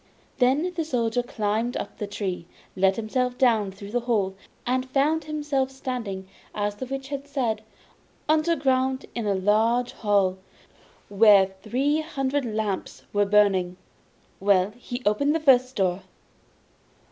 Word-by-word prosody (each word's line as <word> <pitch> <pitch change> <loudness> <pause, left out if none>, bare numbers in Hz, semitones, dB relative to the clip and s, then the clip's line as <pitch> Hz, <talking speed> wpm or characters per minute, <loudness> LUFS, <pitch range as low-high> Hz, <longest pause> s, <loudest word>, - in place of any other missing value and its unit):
Then 280 +8 +2
the 330 - 0
Soldier 245 -5 0
climbed 225 0 -2
up - - -7
the 210 - -3
tree, 190 -4 -4 0.3
let 190 0 +3
himself 250 +3 -1
down 220 -6 +3
through 200 +1 -10
the 245 - +1
hole, 200 -5 +1 0.3
and 255 +1 -1
found 295 +4 +1
himself 295 -3 -1
standing, 240 -8 -5 0.3
as 205 0 -1
the 255 +5 -7
Witch 270 +1 -5
had 280 0 -5
said, 255 -6 -1 0.7
underground 275 -4 +1
in 235 -2 -3
the 200 -1 +1
large 220 +5 +2
hall, 195 -3 +1 0.7
where 200 -2 +5
the 215 - -13
three 280 +6 +1
hundred 280 -3 -2
lamps 215 -3 -3
were 205 0 +3
burning. 195 -3 +3 0.6
Well, 195 0 +3
he 245 +1 -7
opened 280 +9 +2
the - - +1
first 255 -4 +4
door. 185 -1 0
235 Hz, 140 wpm, -25 LUFS, 205-270 Hz, 0.7 s, where